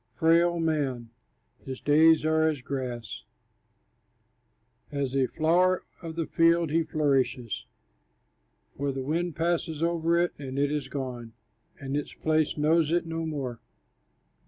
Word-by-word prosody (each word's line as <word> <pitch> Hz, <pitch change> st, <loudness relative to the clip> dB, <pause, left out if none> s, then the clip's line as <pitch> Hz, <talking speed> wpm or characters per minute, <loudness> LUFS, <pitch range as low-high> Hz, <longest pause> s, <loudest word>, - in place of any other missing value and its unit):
Frail 170 Hz, +1 st, +3 dB
man 140 Hz, -8 st, -1 dB, 0.5 s
his 130 Hz, -1 st, -6 dB
days 155 Hz, +2 st, +5 dB
are 160 Hz, 0 st, +3 dB
as 145 Hz, -5 st, -4 dB
grass; 125 Hz, -5 st, -5 dB, 1.7 s
As 140 Hz, -2 st, -2 dB
a 135 Hz, -2 st, +2 dB
flower 180 Hz, +5 st, +2 dB, 0.2 s
of 165 Hz, -2 st, -7 dB
the 165 Hz, -1 st, -1 dB
field 165 Hz, -1 st, +3 dB
he 165 Hz, +2 st, +3 dB
flourishes, 135 Hz, -7 st, 0 dB, 1.1 s
For 140 Hz, 0 st, -1 dB
the 135 Hz, 0 st, -4 dB
wind 165 Hz, +4 st, -1 dB
passes 165 Hz, -1 st, -1 dB
over 170 Hz, 0 st, +1 dB
it, 175 Hz, 0 st, +1 dB
and 135 Hz, -2 st, -6 dB
it 140 Hz, +1 st, +1 dB
is 150 Hz, -3 st, -2 dB
gone, 125 Hz, -4 st, -6 dB, 0.5 s
And 135 Hz, 0 st, -4 dB
its 145 Hz, -, -3 dB
place 155 Hz, -1 st, 0 dB
knows 155 Hz, +1 st, +2 dB
it 175 Hz, 0 st, +1 dB
no 165 Hz, 0 st, -3 dB
more. 135 Hz, -6 st, -4 dB
155 Hz, 135 wpm, -27 LUFS, 135-165 Hz, 1.7 s, days